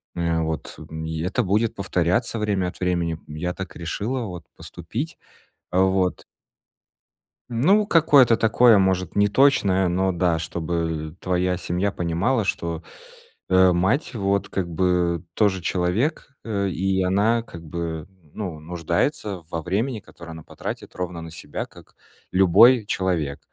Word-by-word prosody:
э, 85 -1 0
вот, 80 -1 -4
м, 80 0 -7
и 80 0 -4
это 95 +9 0
будет 105 +3 +1
повторяться 95 +4 0
время 100 -4 0
от - - -13
времени. 85 -3 -1
Я 80 +4 -4
так 95 -3 -7
решила 105 +9 -3
вот 90 -6 -8
поступить, 115 - -6 0.6
э, 90 - +1
вот. 95 -1 +1 1.3
Ну, 180 - +3
какое-то 145 - +5
такое, 115 0 +5
может, 95 -2 0
не 100 0 +4
точное, 100 -6 +3
но 95 +2 +1
да. 85 -2 +1
Чтобы, 80 -1 -3
э, - - -25
твоя 90 0 0
семья 90 +3 -1
понимала, 95 +8 0
что, 85 -4 -2 0.7
э, 95 0 +6
мать 95 - 0
вот 100 -2 0
как 95 -3 -2
бы 90 -1 +1
тоже 100 -4 +2
человек, 90 - -1
э, 100 -3 -1
и 95 +1 0
она 105 +5 +2
как 85 -7 -11
бы, 80 -1 -5 0.3
ну, 90 -7 -5
нуждается 85 - -2
во 80 - -2
времени, 110 - -1
которое 85 -4 -12
она 80 0 -9
потратит - - -7
ровно 90 -2 -4
на 80 - -8
себя, 80 - -6
как - - -18 0.4
любой 105 +6 +6
человек. 85 -9 -1
90 Hz, 145 wpm, -23 LUFS, 85-105 Hz, 1.3 s, э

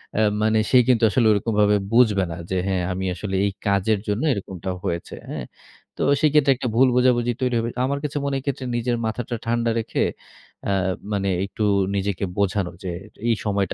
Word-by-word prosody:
অ্যা 110 - +3 0.2
মানে 110 0 +3
সে 130 - +6
কিন্তু 120 -3 +3
আসলে 115 +2 +2
ওরকমভাবে 105 0 +2 0.2
বুঝবে 110 -5 +4
না 80 - -5
যে, 95 - +1
হ্যাঁ, 95 -2 0
আমি 95 +1 -3
আসলে 95 +1 -4
এই 100 - 0 0.2
কাজের 100 +1 +2
জন্য 105 +3 0
এরকমটা 95 -2 -5
হয়েছে। 85 0 -3
হ্যাঁ? - - -5 0.5
তো - - -1 0.2
সেই 155 -2 +4
ক্ষেত্রে 145 -2 +5
একটা 125 - -3
ভুল 130 +2 +6
বোঝাবুঝি 120 -1 +3
তৈরি 125 -2 +1
হবে। 115 - -1 0.2
আমার 140 +1 -1
কাছে 150 0 -3
মনে 140 -1 -1
হয় 135 - 0
এক্ষেত্রে 135 -1 -3
নিজের 120 0 0
মাথাটা 120 +2 -3
ঠান্ডা 115 0 +1
রেখে 110 - -1 0.7
আ - - +2 0.4
মানে 100 -1 0 0.2
একটু 105 +2 -4 0.3
নিজেকে 100 -1 -1
বোঝানো 100 -2 0
যে, 90 - -3 0.4
"এই 115 - +3
সময়টা 100 -3 0
110 Hz, 190 wpm, -23 LUFS, 100-125 Hz, 0.7 s, সে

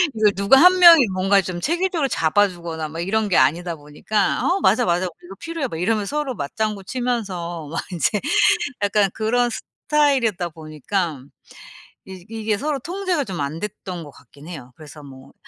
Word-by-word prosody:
이걸 215 -1 +3
누가 200 +7 +5
1 365 +1 +7
명이 335 -8 +8
뭔가 195 +2 +3
좀 180 -2 -6
체계적으로 340 -2 0
잡아 205 -2 +2
주거나 170 -4 -6
막 165 +2 -8
이런 215 +4 0
게 180 - +2
아니다 165 +6 +2
보니까 155 +7 -2
"어 370 +3 +1
맞아, 245 - +3
맞아. 175 0 +1
우리 175 -1 -10
이거 190 +2 -11
필요해." 330 -4 -4
막 160 - -7
이러면 210 +2 0
서로 290 +2 -3
맞장구치면서 200 - -4
막 165 - -2
인제 185 +4 0 0.6
약간 205 -1 +2
그런 240 +3 +1
스타일이었다 245 - 0
보니까 155 -1 -4 0.8
이 185 -2 -11
이게 220 -2 -2
서로 290 +4 -2
통제가 355 0 -2
좀 185 -7 -5
안 140 +3 -4
됐던 190 -3 -6
것 145 - -12
같긴 140 +5 -17
해요. 140 -8 -9
그래서 150 -1 -13
뭐 135 -1 -14
195 Hz, 350 characters per minute, -21 LUFS, 165-245 Hz, 0.8 s, 명이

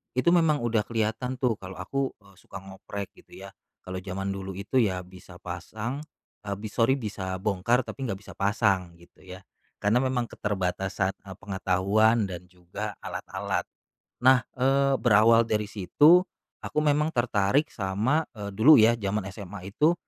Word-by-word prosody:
itu 130 +6 +3
memang 160 -6 +3
udah 115 -2 +1
kelihatan 115 +3 -1
tuh 125 -4 0
kalo 95 0 -9
aku, 135 +5 -3
eee, 100 -1 -20
suka 95 - -10
ngoprek 95 +1 -7
gitu - - -14
ya. - - -9 0.3
Kalo 95 0 -5
jaman 95 +1 -4
dulu 95 -1 -6
itu 100 +7 0
ya 95 -6 +1
bisa 90 0 -14
pasang, 105 +9 -6 0.5
eee, 100 - -2
b 100 - -12
sori 120 +3 +3
bisa 100 -7 -4
bongkar, 110 +5 +1
tapi 135 +2 -6
nggak 95 -3 -4
bisa - - -11
pasang 100 -4 +1
gitu 85 +1 -21
ya. 95 0 -11 0.4
Karna 105 +4 +3
memang 125 -2 -1
keterbatasan, 95 -1 -1 0.2
eee, 95 - -8
pengetahuan 100 +4 +1
dan 90 -2 -6
juga 90 +4 -7
alat-alat. - - -4 0.5
Nah, 130 0 +5
eee, 135 +1 +2
berawal 115 0 +6
dari 105 -1 0
situ, 150 - +5 0.4
aku - - -1
memang 150 +1 +1
tertarik 120 +4 +1
sama, 110 +11 0
eee, 105 -2 -6
dulu 110 +10 +6
ya 115 +2 +5
jaman 105 0 -1
SMA 95 -2 -9
itu, 150 - +3
105 Hz, 160 wpm, -27 LUFS, 95-125 Hz, 0.5 s, berawal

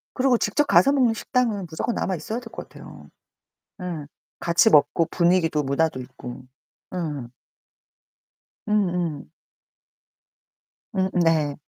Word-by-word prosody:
그러고 255 -2 +3
직접 215 +9 +1
가서 280 -1 +5
먹는 250 -5 +3
식당은 220 -6 -1
무조건 165 +8 -2
남아 190 - -1
있어야 215 +9 -4
될 245 - -15
것 - - -8
같아요. - - -13 0.7
에. 165 -5 -5 0.3
같이 170 +6 +4
먹고 160 +1 +4
분위기도 170 -4 +2
문화도 140 0 0
있고. 125 0 -9 0.5
음. 150 -8 -4 1.4
음음. 175 -8 0 1.6
음음 190 -1 +1
네. 155 -3 +2
175 Hz, 230 characters per minute, -24 LUFS, 150-215 Hz, 1.6 s, 가서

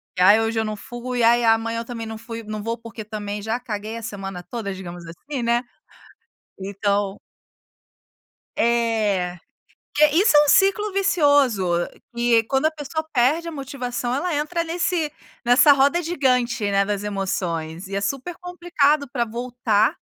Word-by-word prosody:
"Que, 180 - -1
ai, 205 +4 +7
hoje, 225 0 0
eu 220 - 0
não 215 0 -3
fui, 240 +3 -4
ai, 240 +1 +5
e - - +1
amanhã 225 +1 +2
eu 230 - -5
também 230 -2 -6
não 220 0 -6
fu 230 +1 -8
não 215 0 -5
vou 230 +1 -2
porque, 230 -1 -9
também, 210 -1 -5
já, 225 +3 -2
caguei 220 -2 -5
a - - -7
semana 195 -4 -6
toda", 205 -1 -5
digamos 175 -2 -8
assim, 250 - -6
né. 235 +1 +2 1.0
Então 200 0 -1 1.4
É. 220 -6 +1 0.6
Que 300 +1 +7
isso 330 0 +5
é 295 - +7
um - - -3
ciclo 395 +2 +4
vicioso 290 - +3 0.5
que 235 -1 +3
quando 270 +6 +1
a - - -1
pessoa 315 +1 -4
perde 295 +7 +2
a - - -4
motivação 255 -4 -4
ela, 320 +3 -1
entra 335 +3 -1
nesse 335 -2 -1 0.3
nessa 245 +5 +6
roda 280 +5 +3
gigante, 250 -9 +1
né, 200 0 +2
das 205 0 -2
emoções, 180 -4 -3
e 195 - -5
é 200 - -1
super 275 - -3
complicado 335 -5 +1
pra 240 -3 0
voltar 235 -2 0
235 Hz, 165 wpm, -22 LUFS, 210-285 Hz, 1.4 s, ai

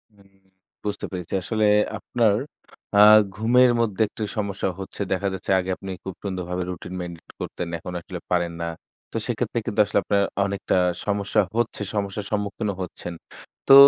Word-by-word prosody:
হুম 100 -1 -21 0.6
বুঝতে 105 - -2
পেরেছি। 90 -3 -5
আসলে 110 -2 +1 0.3
আপনার 115 -4 +2 0.6
আ - - +7 0.4
ঘুমের 120 +4 +5
মধ্যে 110 -3 0
একটা 110 - -6
সমস্যা 100 -2 -1
হচ্ছে। 95 +1 -6
দেখা 95 +1 +1
যাচ্ছে 95 - -3
আগে 90 - -3
আপনি 95 - -8
খুব 95 - -5
সুন্দরভাবে 90 -2 -2
রুটিন 90 0 -6
মেনটেইন 85 -2 -8
করতেন। 90 - -4
এখন 90 +2 -7
আসলে - - -7
পারেন 85 -1 +1
না। 85 - -1 0.4
তো - - -2
সেক্ষেত্রে - - -1
কিন্তু - - -2
আসলে - - +2
আপনার 100 -1 +2 0.2
অনেকটা 100 0 -1 0.3
সমস্যা 105 +1 +2 0.2
হচ্ছে, 120 -3 0
সমস্যার 100 0 -2
সম্মুখীনও 105 0 -1
হচ্ছেন। 90 -1 -6 0.5
তো - - +9
100 Hz, 155 wpm, -24 LUFS, 90-105 Hz, 0.6 s, তো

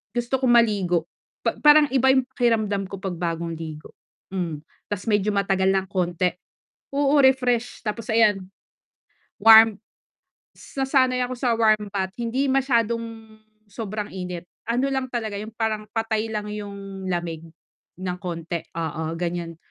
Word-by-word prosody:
gusto 240 +2 0
ko 260 - 0
maligo 200 -8 +3 0.4
pa - - +2
parang 295 0 +7
iba 265 0 +4
'yung 260 - +3
pakiramdam 215 -6 +1
ko 195 - -7
'pag 190 -2 -4
bagong 170 -1 -2
ligo, 155 -2 -8 0.4
mm. 165 -5 -3 0.3
Ta's 205 - -3
medyo 210 -1 +2
matagal 195 -1 +1
ng 190 -1 0
konti 180 -1 0 0.6
oo, 285 +1 +3
refreshed 250 -3 +2
tapos 230 +2 -3
ayan, 210 -4 +3 0.9
warm 220 -1 +8 0.8
s - - -16
nasanay 260 -2 +2
ako 250 - -4
sa 245 -2 +1
warm 215 -2 +3
bath, 190 -1 -2
hindi 235 +4 0
masyadong 235 -4 +2 0.7
sobrang 210 0 -5
init, 180 -2 -5 0.2
ano 255 +4 +1
lang 265 -1 -1
talaga 220 -4 -3
'yung 215 +2 -8
parang 215 -2 -2
patay 225 -1 -1
lang 210 -1 -2
'yung 200 -2 -7
lamig 170 -2 -3 0.5
ng 180 -1 -4
konti, 170 -1 -4 0.2
oo, 160 0 -3
ganiyan. 170 -1 -3
210 Hz, 140 wpm, -24 LUFS, 180-235 Hz, 0.9 s, warm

